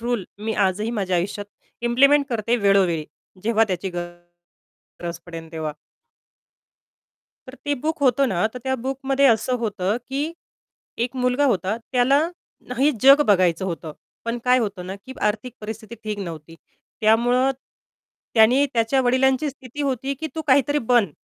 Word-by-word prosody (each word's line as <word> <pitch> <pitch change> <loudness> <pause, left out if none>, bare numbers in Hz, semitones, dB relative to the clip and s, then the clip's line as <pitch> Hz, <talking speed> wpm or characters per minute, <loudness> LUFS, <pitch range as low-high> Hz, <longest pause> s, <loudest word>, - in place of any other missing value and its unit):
Rule 235 -5 -1
मी 220 +1 -2
आजही 210 +5 -2
माझ्या 190 -5 -1
आयुष्यात 200 +3 -3 0.4
इम्प्लिमेंट 275 +4 +4
करते 235 -1 0
वेळोवेळी. 195 -7 +2 0.4
जेव्हा 225 0 +3
त्याची 185 +1 -2
गरज 175 0 -10 0.7
पडेल 165 -2 -9
तेव्हा. 155 -2 -3 1.8
तर 255 - -9
ते 290 0 +1
बुक 305 +4 -3
होतं 275 +1 +4
ना, 190 -1 +1
तर - - -5
त्या 265 0 0
बुकमध्ये 270 +1 +1
असं 240 +1 +2
होतं, 205 -2 -1
की 285 +5 -2 0.7
एक 250 +2 -6
मुलगा 250 +3 +1
होता. 190 +3 -1 0.2
त्याला 260 +3 +4 0.5
ना 250 - -4
हे 280 +3 +4
जग 275 +2 +8
बघायचं 185 -3 +3
होतं, 165 -4 -5 0.3
पण 230 +1 -2
काय 250 0 +5
होतं 200 -6 -3
ना, 190 - -5
की 205 +6 -11 0.2
आर्थिक 220 +3 -4
परिस्थिती 220 +1 -7
ठीक 210 -1 -3
नव्हती. 165 -4 -7 0.5
त्यामुळं 245 +4 +3 0.8
त्याने 240 +5 +5
त्याच्या 235 +3 +2
वडिलांची 260 +3 +2
स्थिती 270 +1 -8
होती, 270 0 -1
की 315 +4 -5
तू 320 - -3
काहीतरी 280 +1 +3
बन, 225 -8 +4
230 Hz, 145 wpm, -23 LUFS, 195-265 Hz, 1.8 s, जग